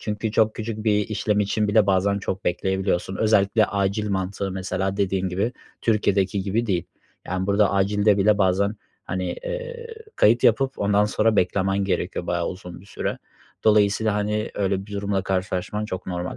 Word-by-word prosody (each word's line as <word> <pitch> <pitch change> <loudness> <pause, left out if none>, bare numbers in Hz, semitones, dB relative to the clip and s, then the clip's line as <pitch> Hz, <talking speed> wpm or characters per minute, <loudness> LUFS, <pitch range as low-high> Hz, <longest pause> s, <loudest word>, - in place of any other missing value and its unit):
Çünkü 105 0 -3
çok 110 -1 +3
küçük 110 -1 -5
bir 105 -2 +2
işlem 105 -1 0
için 105 +1 0
bile 105 0 +4
bazen 100 +1 +2
çok 95 -1 -4
bekleyebiliyorsun. 95 +1 -1
Özellikle 105 0 +3
acil 100 +1 -1
mantığı 95 +1 -2
mesela, 95 +1 -2
dediğin 95 -2 0
gibi, 100 +7 -1 0.3
Türkiye'deki 100 -3 +1
gibi 105 +5 -1
değil 90 -5 0 0.4
yani 95 0 -2
burada 100 0 +3
acilde 100 +1 +2
bile 105 +1 +3
bazen, 100 +2 +2 0.3
hani, 95 -1 -3
eee, - - -6 0.3
kayıt 120 +3 +4
yapıp 130 +4 +3
ondan 100 +1 +3
sonra 110 +1 +1
beklemen 95 +1 +1
gerekiyor 90 -2 -2
bayağı 85 -1 0
uzun 90 -2 -8
bir - - -18
süre. - - -4 0.5
Dolayısıyla, 105 0 +3
hani, 105 +1 -1
öyle 95 -1 -1
bir 105 - -11
durumla 100 -1 -1
karşılaşman 95 +2 -2
çok 95 -2 -6
normal. 90 -1 -4
100 Hz, 160 wpm, -23 LUFS, 95-105 Hz, 0.5 s, bile